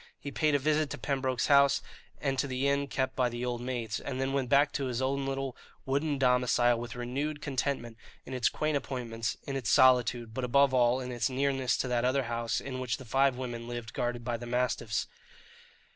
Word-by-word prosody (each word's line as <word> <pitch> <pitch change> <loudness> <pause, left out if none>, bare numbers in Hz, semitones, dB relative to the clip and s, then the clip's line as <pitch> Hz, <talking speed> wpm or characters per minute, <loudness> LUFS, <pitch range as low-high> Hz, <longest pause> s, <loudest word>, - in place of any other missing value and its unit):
He 140 - -6
paid 150 0 +2
a - - +6
visit 150 +1 +1
to - - -5
Pembroke's 130 -3 -1
house, 140 -1 +5 0.4
and 135 -2 -1
to 140 - +1
the 130 +1 -1
inn 140 0 +1
kept 130 -1 -2
by 125 -2 +2
the 120 +1 -4
old 120 -1 -2
maids, 120 -3 -3
and 130 -2 -5
then 135 0 -1
went 135 -3 0
back 140 +1 +4
to 140 - -2
his 125 -2 -2
own 135 +1 -1
little 135 -1 -3 0.3
wooden 140 +2 0
domicile 125 -2 +3
with 120 0 -6
renewed 140 +5 -3
contentment 135 -5 -2 0.3
in 130 - -7
its 125 -2 +2
quaint 155 0 -1
appointments, 115 -5 -4
in 135 - -4
its 130 -6 -2
solitude, 120 -3 +4
but 130 - -3
above 135 +2 +4
all 125 0 +4
in 125 -1 -5
its 120 +2 0
nearness 135 -1 +1
to - - -1
that 120 -1 0
other 130 +2 +2
house 115 -1 -1
in 130 -2 -5
which 125 -4 -2
the 130 - -11
five 135 +2 +2
women 120 -2 -5
lived 120 -2 -6
guarded 120 0 -2
by 120 -1 -1
the 120 +1 -8
mastiffs. 120 -3 0
130 Hz, 210 wpm, -30 LUFS, 120-140 Hz, 0.4 s, a